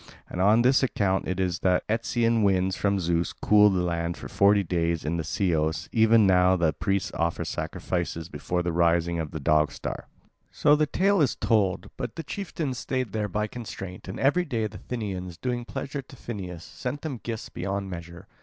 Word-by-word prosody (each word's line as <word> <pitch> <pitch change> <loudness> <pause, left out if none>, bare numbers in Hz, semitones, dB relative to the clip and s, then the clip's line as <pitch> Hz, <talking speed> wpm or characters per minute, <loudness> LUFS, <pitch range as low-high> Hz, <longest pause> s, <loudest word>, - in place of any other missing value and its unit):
And 90 - -4
on 105 +5 +5
this 130 +2 +4
account 100 -7 0
it 95 0 -2
is 90 -2 0
that 90 -1 +2
Etesian 115 +1 +1
winds 95 -2 +2
from 100 -1 +1
Zeus 85 -1 0
cool 105 0 +5
the 95 -2 0
land 85 -1 -2
for - - -8
forty 100 0 +4
days, 85 -2 -1
and 85 +2 -1
in - - -1
Ceos 80 -1 0
even 110 -1 +5
now 90 -1 +5
the 85 -3 +2
priests 95 0 -1
offer 85 0 -1
sacrifices 85 -2 -3
before 90 0 -2
the 85 - -1
rising 85 0 +2
of 80 -2 -3
the 80 - -6
Dog 75 0 +3
star. - - -6 0.4
So 150 0 +4
the 150 0 +2
tale 195 +3 +2
is 140 - +2
told, 100 -5 +1
but 125 -3 -4
the 165 - -5
chieftains 155 - -4
stayed 130 -5 -2
there 105 0 -1
by 105 +3 -1
constraint, 100 -5 -8
and 95 - -6
every 145 +7 +3
day 115 -9 -2
the 105 -3 -6
Thynians, 95 -8 -5
doing 120 -1 -2
pleasure 140 +3 -5
to 135 - -15
Phineus, 95 -9 -7
sent 125 +8 -6
them 140 -7 -4
gifts 115 +3 -5
beyond 95 +2 -3
measure. 85 0 -8
95 Hz, 190 wpm, -26 LUFS, 85-115 Hz, 0.4 s, on